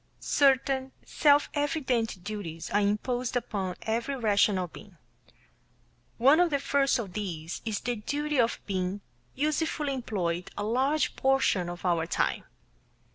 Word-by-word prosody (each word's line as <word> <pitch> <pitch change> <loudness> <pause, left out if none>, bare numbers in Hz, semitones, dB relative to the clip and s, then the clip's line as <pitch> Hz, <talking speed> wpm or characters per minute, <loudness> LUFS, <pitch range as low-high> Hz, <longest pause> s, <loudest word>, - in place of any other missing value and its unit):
Certain 270 -1 +2
self 290 -1 +4
evident 260 - -1
duties 175 -6 -6
are 205 - +3
imposed 240 +5 -1
upon 195 -6 -2
every 230 +5 -1
rational 205 -5 +2
being. 195 +1 -14 1.2
One 275 +7 +6
of 355 -1 +4
the 285 - +1
first 275 0 +2
of 205 -7 -5
these 170 -6 -5
is 215 -2 -2
the 245 -1 -2
duty 290 +6 -2
of 235 -1 +2
being 190 0 -2 0.3
usefully 300 0 0
employed 180 -9 -2
a 205 - -2
large 265 +8 +1
portion 265 -10 +2
of 175 +2 -7
our 170 -2 +1
time. - - 0
230 Hz, 130 wpm, -28 LUFS, 195-275 Hz, 1.2 s, One